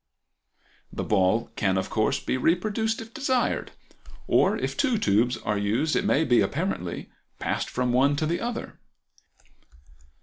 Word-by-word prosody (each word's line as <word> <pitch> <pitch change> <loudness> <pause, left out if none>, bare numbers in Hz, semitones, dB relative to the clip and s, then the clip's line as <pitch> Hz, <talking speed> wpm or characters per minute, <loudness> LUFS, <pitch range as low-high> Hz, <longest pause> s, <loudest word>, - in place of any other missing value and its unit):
The - - -4
ball 105 +3 +1
can 95 -2 +1
of 95 - -2
course 110 +6 +1
be - - -2
reproduced 210 - 0
if 225 0 -11
desired; 260 -4 0 0.5
or - - +3
if - - -3
two 275 -5 +1
tubes 120 - +2
are 105 -2 -2
used 110 +10 0
it - - +1
may 150 - +3
be, 120 -4 +4
apparently, 145 - -3 0.3
passed - - -2
from 125 -1 -1
one 140 +3 +3
to 155 - -1
the 170 +2 -1
other. 240 0 -5
140 Hz, 145 wpm, -26 LUFS, -, 0.5 s, be